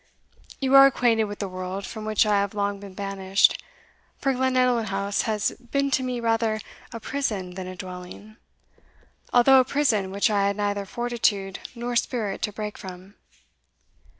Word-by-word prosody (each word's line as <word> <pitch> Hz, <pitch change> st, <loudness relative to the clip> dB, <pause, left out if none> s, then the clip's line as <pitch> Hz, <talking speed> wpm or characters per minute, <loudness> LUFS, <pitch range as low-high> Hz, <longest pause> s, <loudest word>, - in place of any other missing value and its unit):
You 265 Hz, -1 st, 0 dB
are 275 Hz, 0 st, +10 dB
acquainted 235 Hz, -4 st, +2 dB
with 205 Hz, 0 st, -7 dB
the 200 Hz, -, -3 dB
world, 185 Hz, +1 st, -5 dB
from 220 Hz, -2 st, -7 dB
which 215 Hz, 0 st, +3 dB
I 210 Hz, -1 st, +3 dB
have 200 Hz, +1 st, -2 dB
long 200 Hz, -1 st, -1 dB
been 195 Hz, -2 st, -11 dB
banished; 195 Hz, -1 st, +1 dB, 0.5 s
for 270 Hz, -1 st, 0 dB
Glenallan 255 Hz, -2 st, +2 dB
House 200 Hz, +1 st, -1 dB
has 215 Hz, -1 st, 0 dB
been 275 Hz, +3 st, -2 dB
to 265 Hz, -, +2 dB
me 250 Hz, -1 st, -2 dB
rather 225 Hz, -1 st, +1 dB, 0.3 s
a 230 Hz, -, -6 dB
prison 215 Hz, -9 st, -3 dB
than 185 Hz, 0 st, -6 dB
a 185 Hz, -, -7 dB
dwelling, 185 Hz, +4 st, -9 dB, 0.9 s
although 260 Hz, +2 st, +6 dB
a -, -, +5 dB
prison 245 Hz, -8 st, +1 dB
which 200 Hz, +3 st, +1 dB
I 200 Hz, -1 st, +2 dB
had 200 Hz, 0 st, -1 dB
neither 205 Hz, -1 st, -1 dB
fortitude 215 Hz, -5 st, -1 dB, 0.2 s
nor 240 Hz, +1 st, -4 dB
spirit 225 Hz, -4 st, -1 dB
to 210 Hz, -, -1 dB
break 210 Hz, 0 st, -6 dB
from." 185 Hz, +1 st, -10 dB
210 Hz, 165 wpm, -25 LUFS, 195-240 Hz, 0.9 s, are